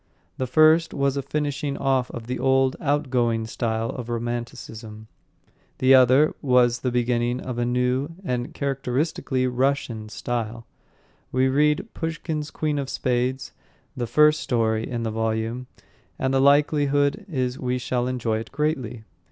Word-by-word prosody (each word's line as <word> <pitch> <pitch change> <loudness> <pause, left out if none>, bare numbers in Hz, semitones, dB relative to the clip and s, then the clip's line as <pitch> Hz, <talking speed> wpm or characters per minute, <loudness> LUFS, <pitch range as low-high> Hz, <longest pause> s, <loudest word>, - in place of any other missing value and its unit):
The 130 - -2
first 155 +4 +4
was 140 -1 +1
a 140 - -1
finishing 145 0 -2
off 135 -2 +1
of 120 -2 -7
the 125 +2 -4
old, 135 0 +3
outgoing 125 -7 +1
style 115 0 -2
of 120 -2 -7
romanticism, 115 -2 -5 0.7
the 130 +1 +5
other 130 +4 +6
was 125 -3 +3
the 130 - -1
beginning 120 0 0
of 130 -2 -5
the 120 0 0
new, 125 +3 0
the 125 -6 -2
characteristically 135 -1 -1
Russian 125 -4 -1
style. 115 0 -4 0.7
We 130 +1 +2
read 150 +9 +1
Pushkin's 160 -2 -3
Queen 150 -2 -2
of 135 -1 -4
Spades, 130 +1 -1 0.4
the 120 -2 -3
first 150 +4 +4
story 110 -2 0
in 120 -2 -3
the 110 - -2
volume, 115 +2 -2 0.5
and 130 0 -1
the 135 - +3
likelihood 145 +4 +3
is 130 -5 -2
we 125 0 -1
shall 125 0 -1
enjoy 115 -3 -1
it 115 - -8
greatly. 135 -6 -2
130 Hz, 145 wpm, -24 LUFS, 120-140 Hz, 0.7 s, other